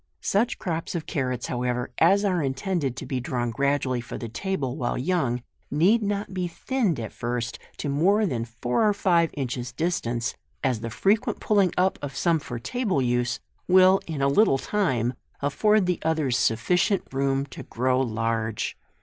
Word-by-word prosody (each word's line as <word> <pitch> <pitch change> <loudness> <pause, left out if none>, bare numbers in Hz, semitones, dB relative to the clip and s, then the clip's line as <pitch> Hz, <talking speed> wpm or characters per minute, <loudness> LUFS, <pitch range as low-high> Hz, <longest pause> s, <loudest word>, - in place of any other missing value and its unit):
u - - -49 0.2
Such 230 +5 +1
crops 165 0 -3
of 165 - -3
carrots, 125 -4 -2
however, 125 0 -2
as 200 +1 +5
are 180 -4 +1
intended 135 0 -1
to - - -6
be 130 - -2
drawn 120 -1 -2
gradually 135 0 0
for 120 - -7
the 115 - -5
table 130 - -2
while 120 - -2
young, 125 -5 0 0.3
need 185 - +4
not 205 -1 -2
be 180 -1 -1
thinned 200 - -1
at 110 -2 -5
first 120 0 -3 0.2
to - - -4
more 185 +10 +3
than 125 - -1
four 120 - +1
or 205 - +1
five 170 -4 +3
inches 125 -3 -3
distance, 125 -6 -1 0.3
as 130 -4 +1
the 115 +1 -4
frequent 200 - +1
pulling 200 -4 +3
up 185 +1 +2
of 140 -1 -5
some 170 -2 +2
for 120 -4 -6
table 210 - -1
use, 125 -1 0 0.3
will 185 +1 +6
in 150 -4 -2
a - - +4
little 140 +1 +4
time 130 - 0 0.3
afford 210 +9 +2
the 180 -1 0
others 155 -6 +1
sufficient 175 - +2
room 135 0 +1
to 135 - -10
grow 130 +2 0
large. 115 -2 -1
140 Hz, 175 wpm, -25 LUFS, 125-185 Hz, 0.3 s, will